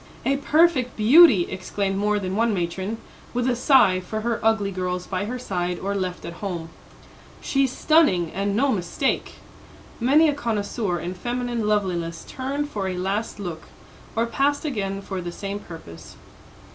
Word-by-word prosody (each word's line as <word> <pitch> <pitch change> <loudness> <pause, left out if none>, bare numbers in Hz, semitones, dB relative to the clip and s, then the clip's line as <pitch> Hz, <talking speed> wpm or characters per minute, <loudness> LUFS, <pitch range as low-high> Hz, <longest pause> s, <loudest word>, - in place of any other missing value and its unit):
"A 275 +1 +2
perfect 290 -3 +2
beauty!" 225 - +7
exclaimed 195 +1 -3
more 210 +1 +1
than 190 -2 -3
one 225 0 +2
matron, 190 +5 -3 0.4
with 245 0 +1
a 250 - +2
sigh 240 -7 +5
for 215 +4 -5
her 235 0 -1
ugly 220 -3 +2
girls 180 -1 -3
by 190 +1 -2
her 245 +4 -4
side 180 -7 -2
or 200 +3 -3
left 185 -2 -3
at 170 - -6
home. 175 -5 -4 0.7
"She's 270 -2 +1
stunning, 255 - +3
and 200 +1 -1
no 270 +5 +3
mistake!" 200 +7 -1 0.7
Many 285 +7 +5
a 295 - +2
connoisseur 210 -7 -2
in 175 +3 -4
feminine 240 +2 -2
loveliness 180 -5 -1
turned 280 +3 -3
for 195 -2 -2
a 185 -1 -3
last 200 +4 -2
look, 175 -5 -6 0.5
or 230 - +2
passed 285 +5 0
again 195 -8 -3
for 190 -2 -4
the 175 0 -5
same 200 +3 -5
purpose. 85 - -11
205 Hz, 160 wpm, -24 LUFS, 185-245 Hz, 0.7 s, beauty